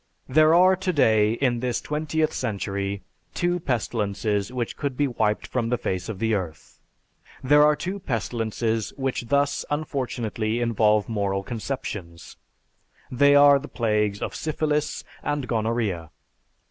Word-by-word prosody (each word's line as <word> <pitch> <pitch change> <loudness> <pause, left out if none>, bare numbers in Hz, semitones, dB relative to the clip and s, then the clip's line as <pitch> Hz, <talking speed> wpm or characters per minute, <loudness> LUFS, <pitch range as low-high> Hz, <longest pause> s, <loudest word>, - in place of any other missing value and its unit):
There 155 +4 +5
are 185 +2 +6
today, 115 - +2
in 120 -1 0
this 125 -1 -1
twentieth 155 +1 -1
century, 100 -3 -3 0.3
two 175 0 0
pestilences 105 - -1
which 125 -2 -3
could 140 -3 -3
be 145 - +2
wiped 110 -4 0
from 120 -3 -2
the 125 - +1
face 95 -3 -3
of 110 - -4
the 110 +2 0
earth. 85 -6 -5 0.6
"There 145 +3 +5
are 150 0 +5
two 185 +6 -4
pestilences 115 - -2
which 130 -3 -2
thus 140 +2 +1
unfortunately 120 -6 -2
involve 110 -3 +2
moral 100 -3 -1
conceptions. 105 - -6 0.7
They 140 +3 +5
are 145 0 +7
the 145 - -9
plagues 105 -3 0
of - - -4
Syphilis 150 -1 -1 0.2
and 145 -3 -2
Gonorrhea. 110 -7 -1
120 Hz, 135 wpm, -24 LUFS, 105-145 Hz, 0.7 s, are